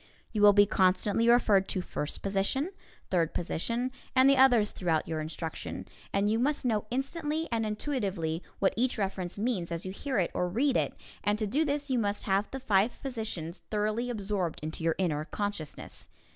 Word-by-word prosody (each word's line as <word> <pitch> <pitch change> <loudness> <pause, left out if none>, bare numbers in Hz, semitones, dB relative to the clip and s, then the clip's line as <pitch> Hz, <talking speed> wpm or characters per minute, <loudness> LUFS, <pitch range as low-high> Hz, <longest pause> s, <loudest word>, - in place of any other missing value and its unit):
You 215 - -1
will 205 0 +9
be 205 0 +7
constantly 200 +4 +2
referred 210 -5 +5
to 185 - -1
"first 150 - -4
position," 200 - 0 0.4
"third 170 -4 +1
position," 230 +9 -1 0.2
and 260 +1 +6
the 275 - +6
others 245 -5 +5
throughout 165 -4 0
your 160 -1 -2
instruction, 160 +1 -5 0.2
and 200 +1 +2
you 220 +2 +2
must 285 +2 0
know 215 -3 +1
instantly 300 +5 -2
and 225 -1 0
intuitively 200 - -2 0.2
what 195 - +2
each 250 +2 +1
reference 190 -3 -2
means 200 -6 -1
as 170 +1 -4
you 185 - -3
hear 260 +6 -3
it 180 -3 +1
or 180 - 0
read 255 +8 +1
it, - - +1 0.3
and 205 0 +2
to 215 - -1
do 275 +10 +1
this 285 -1 -1
you 250 - +2
must 205 -2 -1
have 195 +1 +1
the 270 - -5
five 215 -2 +2
position 220 - -4
thoroughly 215 +5 -2
absorbed 200 -7 -2
into 160 +1 -5
your 165 -1 +2
inner 155 -5 0
consciousness. 205 -5 -5
205 Hz, 185 wpm, -30 LUFS, 185-245 Hz, 0.4 s, will